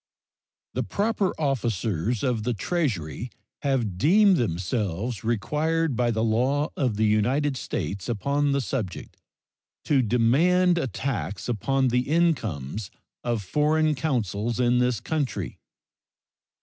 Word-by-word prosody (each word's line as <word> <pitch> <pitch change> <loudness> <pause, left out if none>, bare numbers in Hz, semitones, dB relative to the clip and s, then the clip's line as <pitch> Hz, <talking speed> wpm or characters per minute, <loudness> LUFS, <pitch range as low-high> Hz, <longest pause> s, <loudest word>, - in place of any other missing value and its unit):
The - - -1
proper 205 -2 0
officers 115 - -1
of 125 -5 +1
the 120 +2 -1
Treasury 115 - -2 0.3
have 120 - -1
deemed 195 - +5
themselves 100 - -2
required 150 +7 0
by 120 0 +1
the 110 -1 0
law 130 +7 +1
of 125 -6 0
the 110 - +2
United 130 +7 +2
States 100 -3 -4
upon 140 +6 0
the 140 0 +1
subject 115 -8 -4 0.7
to 140 -3 +3
demand 165 - +3
a 135 - -1
tax 105 -5 -3
upon 130 +3 +1
the 125 +2 0
incomes 110 - 0 0.3
of 120 -4 -1
foreign 155 - +2
consuls 120 - -1
in 125 0 +3
this 125 -2 +1
country. 125 - -3
125 Hz, 120 wpm, -25 LUFS, 105-145 Hz, 0.7 s, deemed